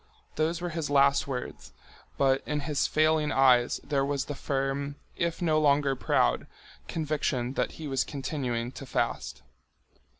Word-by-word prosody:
Those 160 +2 0
were 175 - -2
his 155 -2 -3
last 140 0 +4
words, 130 -2 -6 0.4
but 135 -1 +3
in 150 0 -1
his 145 -1 0
failing 155 -1 +2
eyes 125 -2 +4
there 140 -2 0
was 140 -1 -1
the 145 - -4
firm, 140 +1 -2 0.2
if 170 +1 -2
no 155 -2 +3
longer 140 -2 +3
proud, - - +1 0.4
conviction 150 -5 -1
that - - -1
he 160 - -7
was 135 -2 +1
continuing 130 -4 -3
to 135 - -9
fast. - - -2
140 Hz, 145 wpm, -28 LUFS, 135-155 Hz, 0.4 s, last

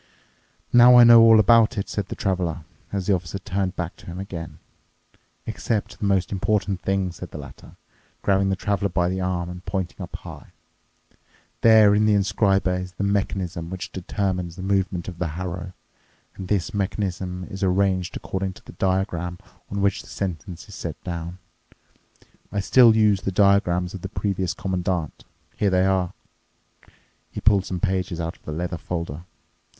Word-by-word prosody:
"Now 120 +1 +8
I 120 - +10
know 115 -1 +9
all 115 -1 +7
about 115 +2 +5
it," 100 - -2
said 100 -2 -3
the - - -6
Traveler, 90 -4 -2 0.3
as 100 -2 -2
the 100 - +3
Officer 90 0 -3
turned 95 -1 -2
back 85 -1 -4
to - - -16
him 85 +1 -6
again. 85 -4 -7 0.9
"Except 105 -2 -3
the - - -2
most 95 -3 +1
important 100 -1 0
thing," 95 -1 0
said 90 +1 -9
the - - -9
latter, 70 -3 -12 0.5
grabbing 95 0 +2
the 95 - +1
Traveler 100 0 -1
by 90 0 +1
the 95 +1 -2
arm 90 -1 -1
and 90 +1 -8
pointing 95 -3 -4
up - - -7
high. - - -10 1.1
"There 110 -2 +7
in 105 +1 +3
the 105 - +4
inscriber 100 -1 +2
is 90 0 -8
the 100 - -4
mechanism 95 -4 -1
which 95 0 -6
determines 90 -2 -3
the 95 - -8
movement 95 -3 0
of 90 -2 -7
the 90 - 0
harrow, 90 0 -5 0.6
and 95 - -7
this 100 -3 -1
mechanism 95 -2 -2
is 95 +1 -8
arranged 95 -1 +1
according 95 0 -3
to - - -17
the - - -10
diagram 90 -2 -1 0.3
on 100 0 -3
which 100 -1 +1
the - - -16
sentence 90 -2 -5
is - - -12
set - - -6
down. 85 0 -5 1.1
I 100 - -1
still 115 +3 +6
use 105 -3 +3
the 95 - -2
diagrams 90 -2 +2
of 95 - -7
the 95 - -5
previous 95 -3 -2
Commandant. 90 -5 -3 0.3
Here 105 - +2
they 95 0 +3
are." 95 -2 +1 1.2
He - - -6
pulled 100 -3 +3
some 90 - -3
pages 95 -3 -1
out 85 0 -3
of - - -27
the - - -5
leather 85 +2 -3
folder. 85 -1 -5
95 Hz, 175 wpm, -23 LUFS, 90-100 Hz, 1.2 s, I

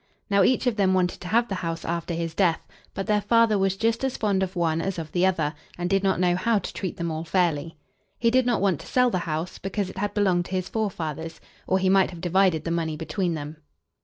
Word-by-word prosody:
Now, 200 0 +5
each 255 +6 +3
of 240 -3 +1
them 190 -2 +3
wanted 180 -1 0
to 180 - -6
have 235 +5 +2
the 200 - -4
house 165 -1 -4
after 170 0 -2
his 165 -1 -3
death; 170 -3 +1 0.3
but 195 - -3
their 210 -1 +2
father 230 +1 +4
was 195 0 +1
just 230 +3 0
as 265 -1 -1
fond 200 -3 +1
of 190 0 -2
one 165 -2 +1
as 195 +1 -3
of 160 -2 -6
the 180 +1 +3
other, 160 -5 0 0.2
and 175 0 -2
did 195 0 +3
not 190 -2 +2
know 180 -1 +3
how 215 +5 +2
to - - -4
treat 185 -3 -4
them 170 -1 -2
all 160 +1 -3
fairly. 165 -3 0 0.4
He 230 -1 +2
did 255 0 +3
not 240 - +1
want 190 -6 +2
to - - -11
sell 250 -1 +3
the 180 -4 -2
house, 160 +4 -3
because 195 0 -3
it - - -8
had 205 +1 -2
belonged 185 -4 +2
to 190 - -8
his 185 0 -2
forefathers, 165 -7 -3 0.3
or 190 - +3
he 190 0 +1
might 190 0 +4
have 175 - -9
divided 180 -2 +2
the 165 - -3
money 160 -2 -1
between 170 +2 -2
them. 150 0 -6
185 Hz, 250 wpm, -25 LUFS, 165-200 Hz, 0.4 s, Now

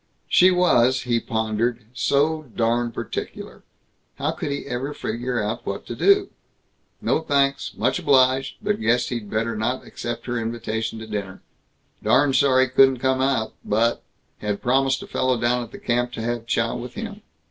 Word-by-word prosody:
She 185 - +6
was, 130 -9 +3
he 120 -2 +1
pondered, 110 +1 -1
so 150 +3 +1
darn 120 +1 +1
particular. - - -6 0.5
How - - -1
could - - -4
he 140 0 -3
ever 135 +3 -4
figure 120 +2 -3
out 105 +2 -3
what - - -2
he - - -5
ought - - -20
to - - -6
do? 400 -1 +4 0.7
No - - +1
thanks; 140 -2 0
much 130 +1 +1
obliged, 130 0 +3
but 210 0 0
guessed 120 +2 +2
he'd 115 -5 -4
better 115 +2 -1
not 110 +4 -2
accept 120 0 -6
her 120 -1 -2
invitation 115 -1 -3
to 110 - -7
dinner. 100 -3 -5 0.6
Darn 135 +6 +3
sorry 130 -1 +4
couldn't 130 0 +5
come 130 -2 +1
but 115 +3 +1 0.4
Had 105 -1 -2
promised 135 +1 +1
a - - -10
fellow 130 -2 0
down 120 +1 +1
at 120 -1 -8
the - - -9
camp 120 0 -1
to - - -5
have 120 0 -3
chow 115 0 0
with 125 +7 -7
him. 220 -2 -6
125 Hz, 170 wpm, -23 LUFS, 115-135 Hz, 0.7 s, She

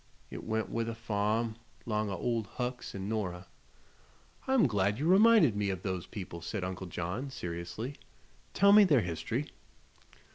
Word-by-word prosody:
It - - -7
went 110 0 -2
with 115 0 -1
the 115 - -3
farm, 110 +1 -1 0.3
'long 105 -2 -1
o' 95 - -2
Old 115 +1 -1
Hucks 125 -3 -4
an' 95 0 -4
Nora." 95 -5 -3 1.0
"I'm 265 -6 +4
glad 105 -4 +1
you 145 - -2
reminded 190 - +6
me 105 -1 0
of 95 -2 -3
those 95 -2 -3
people," 90 -5 -7
said 95 +3 -4
Uncle 95 0 -4
John, 90 +10 -4
seriously. 90 +5 -5 0.6
"Tell 200 +1 +6
me 210 +1 +9
their 150 - +4
history." 90 - -3
110 Hz, 155 wpm, -31 LUFS, 95-125 Hz, 1.0 s, me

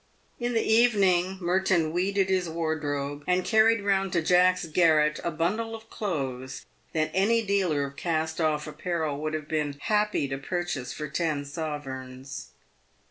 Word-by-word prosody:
In 240 0 -1
the 225 - +2
evening, 195 -5 +3
Merton 175 -2 +1
weeded 190 +3 +1
his 185 -3 0
wardrobe, 145 -3 -2
and 180 0 +2
carried 220 0 +4
round 195 -1 +1
to 170 -2 +1
Jack's 180 +1 +4
garret 155 -2 +3
a - - 0
bundle 210 +8 -1
of 225 0 -13
clothes 135 - -4 0.3
that 155 -1 0
any 225 +4 +3
dealer 185 -8 +1
of 140 0 -9
cast 160 -1 -1
off 150 -1 +1
apparel 155 -1 -3
would 155 0 -2
have 155 -2 -5
been 150 -3 -2
happy 210 -5 +1
to 135 0 -3
purchase 175 -4 -3
for 150 - -5
ten 150 -1 -1
sovereigns. 135 -3 -6
165 Hz, 150 wpm, -27 LUFS, 150-190 Hz, 0.3 s, carried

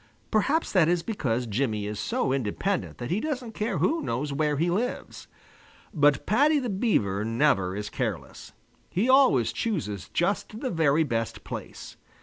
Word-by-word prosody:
Perhaps 275 +9 +1
that 175 -5 +4
is 175 -1 +1
because 125 - -1
Jimmy 110 -2 -1
is 105 0 -4
so 130 +5 0
independent 135 - -2
that 120 0 -5
he 190 - +1
doesn't 260 -4 -3
care 215 +3 -2
who 325 +2 +1
knows 140 - -2
where 150 0 0
he 165 +4 +1
lives. 235 +8 -3 0.7
But 145 -4 +3
Paddy 290 +8 +3
the 250 -6 -1
Beaver 105 - +1
never 115 -6 +1
is 105 +1 -5
careless. - - -5 0.4
He 200 +7 0
always 260 - +4
chooses 120 - -3
just 200 +4 -1
the 260 - -2
very 160 -2 +3
best 115 -6 -3
place. - - -8
155 Hz, 155 wpm, -26 LUFS, -, 0.7 s, that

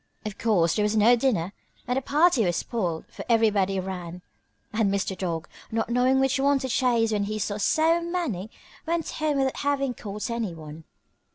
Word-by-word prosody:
Of 210 -2 -6
course 180 -8 +2
there 215 - +1
was 210 +1 +1
no 225 +4 +6
dinner 215 -8 0 0.3
and 250 - 0
the 265 - 0
party 295 -2 +3
was 175 -3 +1
spoiled, 175 -9 -2
for - - -8
everybody 205 -4 +3
ran, 180 -2 -6 0.5
and 215 -2 +2
Mr. 195 -1 -1
Dog, 175 -3 -3 0.2
not 225 +1 -1
knowing 255 +2 +3
which 270 +1 +2
one 280 +1 +3
to 260 -1 -4
chase 235 -2 +2
when 205 -1 0
he 215 +1 -3
saw 205 0 -2
so 320 +10 +2
many, 335 - -3 0.4
went 335 0 -1
home 305 -2 -1
without 270 -1 0
having 275 -2 0
caught 210 +1 -5
anyone. 165 -9 -5
225 Hz, 180 wpm, -26 LUFS, 190-265 Hz, 0.5 s, no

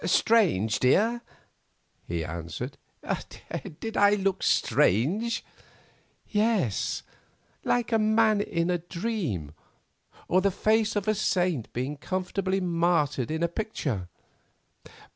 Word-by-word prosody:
"Strange, 170 - +3
dear?" 225 - +3 0.9
he 85 -2 -2
answered; 80 0 -5 1.0
"did 225 -1 -5
I 205 0 +5
look 195 -1 0
strange?" 180 - +2 0.8
"Yes; 210 - 0 0.6
like 245 -1 0
a 225 - +3
man 215 -1 +3
in 170 -3 -1
a 175 - 0
dream 170 - -3 0.8
or 185 +2 +3
the 200 - +3
face 215 +3 +1
of 205 0 -1
a 215 - +4
saint 180 - 0
being 130 +4 -3
comfortably 190 +3 -2
martyred 165 -7 +1
in 160 +2 -1
a - - +3
picture. 150 - -3
185 Hz, 105 wpm, -27 LUFS, 140-215 Hz, 1.0 s, I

